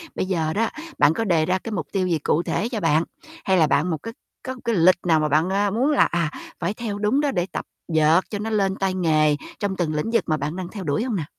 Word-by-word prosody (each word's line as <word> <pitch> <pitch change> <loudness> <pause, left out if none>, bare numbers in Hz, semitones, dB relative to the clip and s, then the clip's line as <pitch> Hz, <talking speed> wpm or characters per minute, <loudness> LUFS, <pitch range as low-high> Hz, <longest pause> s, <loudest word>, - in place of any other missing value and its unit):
bây - - -1
giờ 165 -4 -1
đó, 225 +2 +1 0.3
bạn 145 +2 +5
có 225 - -1
đề 170 -7 +2
ra, 185 +3 +1
cái, 225 - -5
mục 170 -8 -3
tiêu 190 -2 0
gì 165 -3 0
cụ 155 +3 +1
thể 220 - -1
cho 235 -4 -3
bạn, 165 -3 +2 0.4
hay 190 -2 +3
là 160 -3 +4
bạn 150 +4 +1
một 160 - -1
cái 230 - -6 0.3
có 260 - -4
một 255 - -13
cái 230 - +1
lịch 180 +1 +5
nào 160 -2 +4
mà 155 - +1
bạn, 155 +5 +2
a, 200 +1 +1
muốn 250 +8 +1
là, 290 - +5
à, 170 -3 -1 0.3
phải 175 - -1
theo 215 -2 -4
đúng 215 +7 +2
đó 290 -2 +1
để 175 -8 0
tập - - -4 0.2
dượt 160 0 +4
cho 205 - -4
nó 215 +2 -3
lên 195 -3 +1
tay 195 -1 -1
nghề 155 -4 +2 0.2
trong 200 -2 -2
từng 165 -3 -1
lĩnh 150 +9 -1
vực 230 - +2
mà 155 - +1
bạn 150 +2 -3
đang 185 -1 -5
theo 200 -1 -7
đuổi 145 +5 0
hông 245 -4 -2
nè? 170 - -1
185 Hz, 285 wpm, -23 LUFS, 160-210 Hz, 0.4 s, bạn